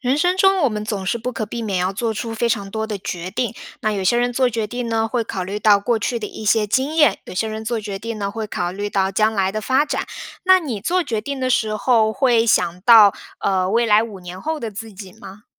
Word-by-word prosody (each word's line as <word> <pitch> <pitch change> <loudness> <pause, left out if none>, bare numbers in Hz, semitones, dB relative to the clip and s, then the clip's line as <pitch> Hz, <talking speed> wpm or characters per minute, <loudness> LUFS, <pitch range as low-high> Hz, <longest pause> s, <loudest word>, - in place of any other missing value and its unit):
人 260 +2 +1
生 360 +3 +2
中 385 0 +4
我 - - +5
们 210 -2 -4
总 200 -3 -4
是 235 - 0
不 245 +2 -4
可 220 -3 -3
避 235 +3 -5
免 200 -4 -1
要 185 +2 0
做 225 +3 -2
出 225 +1 -4
非 235 +1 0
常 200 -4 -2
多 220 0 -2
的 210 -2 -3
决 180 -1 -5
定， 235 +3 -2 0.3
那 215 -2 +1
有 200 -2 -2
些 240 +6 +2
人 245 0 +1
做 255 0 +2
决 225 -2 -2
定 245 +2 -4
呢， 225 -1 +1
会 235 +1 -1
考 190 -4 -4
虑 200 +3 -5
到 210 -2 +5
过 230 +4 0
去 235 +2 -2
的 215 - -5
一 215 - -9
些 215 0 +3
经 265 +8 0
验， 295 -11 +4
有 - - -9
些 210 +5 0
人 220 0 -5
做 230 0 -2
决 205 -2 -5
定 230 +1 -5
呢， 200 -1 -2
会 220 +1 -4
考 180 -3 -3
虑 205 +2 -4
到 190 -1 0
将 215 +3 +2
来 195 -2 0
的 215 - -2
发 260 +6 +2
展， 300 - -2 0.4
那 375 0 +6
你 265 - -4
做 355 - 0
决 225 -6 -2
定 280 +5 -5
的 255 0 -1
时 220 -4 +1
候， 220 -1 +2
会 240 -3 +3
想 180 -6 +1
到， 215 -1 +7 0.3
呃， 185 -1 +1
未 230 +3 +2
来 210 0 +5
5 220 -4 -7
年 180 0 -9
后 315 +5 -3
的 230 -5 -5
自 220 +2 -8
己 190 -1 -10
吗？ 200 +3 -13
220 Hz, 290 characters per minute, -20 LUFS, 200-240 Hz, 0.4 s, 到